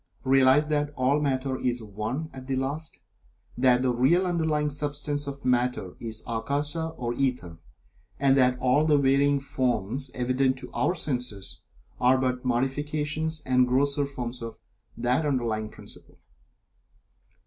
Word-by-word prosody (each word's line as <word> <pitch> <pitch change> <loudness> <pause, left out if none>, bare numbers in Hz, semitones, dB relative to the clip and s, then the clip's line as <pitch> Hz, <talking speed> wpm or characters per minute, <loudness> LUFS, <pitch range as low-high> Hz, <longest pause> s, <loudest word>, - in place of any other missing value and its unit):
Realize 135 +2 +5
that 150 -1 0
all 135 +3 +2
Matter 135 -2 -1
is 120 -2 0
One 110 +9 -4
at 130 -1 -10
the 135 - -1
last 140 - -3 0.6
that 125 0 +4
the 125 -1 +2
real 155 +10 +3
underlying 160 -4 0
substance 145 0 -1
of 140 0 -7
Matter 125 -7 0
is 110 -1 -5
Akasa 145 +8 -1
or 120 -1 -2
Ether, 120 -11 -2 0.6
and 135 -1 +4
that 125 -2 +4
all 130 +4 +2
the 150 -2 +4
varying 140 +1 +3
forms 130 -1 -1
evident 130 +1 +1
to - - -9
our 180 - 0
senses 125 - -3 0.4
are 125 +1 +4
but 125 -1 -1
modifications 150 +5 -1
and 125 -1 +3
grosser 140 +2 +1
forms 125 -3 -5
of 115 -1 -7 0.4
that 125 +5 +1
underlying 115 -7 -1
principle. - - -12
130 Hz, 135 wpm, -26 LUFS, 125-145 Hz, 0.6 s, Realize